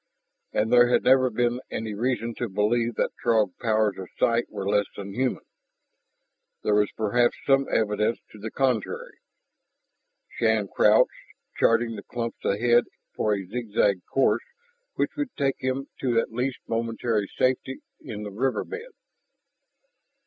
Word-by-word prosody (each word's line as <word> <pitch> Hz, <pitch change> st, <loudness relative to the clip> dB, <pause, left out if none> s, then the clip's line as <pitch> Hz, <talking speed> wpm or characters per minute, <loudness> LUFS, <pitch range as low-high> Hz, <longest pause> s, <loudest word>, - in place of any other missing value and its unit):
And 110 Hz, +2 st, 0 dB
there 120 Hz, 0 st, +7 dB
had -, -, +3 dB
never 130 Hz, 0 st, +5 dB
been 120 Hz, +1 st, 0 dB
any 110 Hz, -1 st, -4 dB
reason 115 Hz, +1 st, -1 dB
to 120 Hz, -, -2 dB
believe 115 Hz, +4 st, +1 dB
that -, -, 0 dB
Throg 110 Hz, -6 st, +2 dB
powers 110 Hz, -4 st, +1 dB
of 95 Hz, -, -7 dB
sight 120 Hz, -1 st, +2 dB
were 95 Hz, -, -5 dB
less 100 Hz, -1 st, +2 dB
than 100 Hz, -1 st, -7 dB
human; 130 Hz, +3 st, -1 dB, 1.2 s
there 105 Hz, -, +2 dB
was 105 Hz, 0 st, +3 dB
perhaps 120 Hz, +3 st, +2 dB
some 135 Hz, 0 st, +3 dB
evidence 105 Hz, +1 st, +1 dB
to 105 Hz, -, -13 dB
the 110 Hz, +2 st, -5 dB
contrary. 125 Hz, -3 st, -1 dB, 1.1 s
Shann 110 Hz, -3 st, 0 dB
crouched, -, -, +4 dB, 0.5 s
charting 115 Hz, 0 st, +3 dB
the -, -, -6 dB
clumps 115 Hz, +2 st, -5 dB
ahead 120 Hz, +4 st, +3 dB, 0.3 s
for 105 Hz, -1 st, +1 dB
a 100 Hz, -1 st, -5 dB
zigzag 100 Hz, -3 st, 0 dB
course 135 Hz, -, +3 dB, 0.5 s
which -, -, -1 dB
would 290 Hz, -4 st, -3 dB
take 135 Hz, -2 st, +1 dB
him 130 Hz, +1 st, -2 dB
to 120 Hz, -3 st, +2 dB
at -, -, -2 dB
least 125 Hz, +3 st, -2 dB
momentary 115 Hz, -2 st, -1 dB
safety 130 Hz, +1 st, 0 dB, 0.2 s
in 105 Hz, -1 st, -7 dB
the 105 Hz, -, -6 dB
river 125 Hz, +6 st, 0 dB
bed. 455 Hz, +3 st, -8 dB
115 Hz, 145 wpm, -26 LUFS, 105-125 Hz, 1.2 s, there